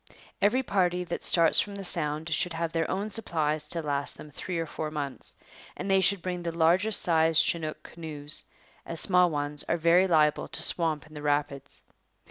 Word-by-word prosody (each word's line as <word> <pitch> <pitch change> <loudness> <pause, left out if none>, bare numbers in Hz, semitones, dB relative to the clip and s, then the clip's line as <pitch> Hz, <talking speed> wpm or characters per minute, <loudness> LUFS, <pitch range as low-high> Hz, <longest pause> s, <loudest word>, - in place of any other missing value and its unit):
Every 250 +6 +2
party 180 -5 0
that 175 -1 -6
starts 165 -2 +7
from 205 -1 -2
the 200 -1 -5
Sound 160 -1 -2
should 175 +2 0
have 165 0 -3
their 165 -1 -1
own 200 +3 -3
supplies 155 -8 -1
to 165 -1 -4
last 145 -1 -1
them 150 - -12
three 180 +4 -5
or 165 - -2
four 155 0 -5
months, 145 -3 -5 0.4
and 195 - -3
they 195 0 +4
should 195 -1 +2
bring 180 -1 -4
the 170 -1 -3
largest 175 +6 +2
size 160 -2 +3
chinook 155 -2 0
canoes, 155 -3 -3 0.4
as 165 - -6
small 180 -1 +4
ones 145 -1 -1
are 170 - +1
very 170 +3 +3
liable 155 -4 +2
to - - 0
swamp 160 -4 +1
in 155 - -18
the 150 - -8
rapids. 145 -2 -2
165 Hz, 190 wpm, -27 LUFS, 150-180 Hz, 0.4 s, starts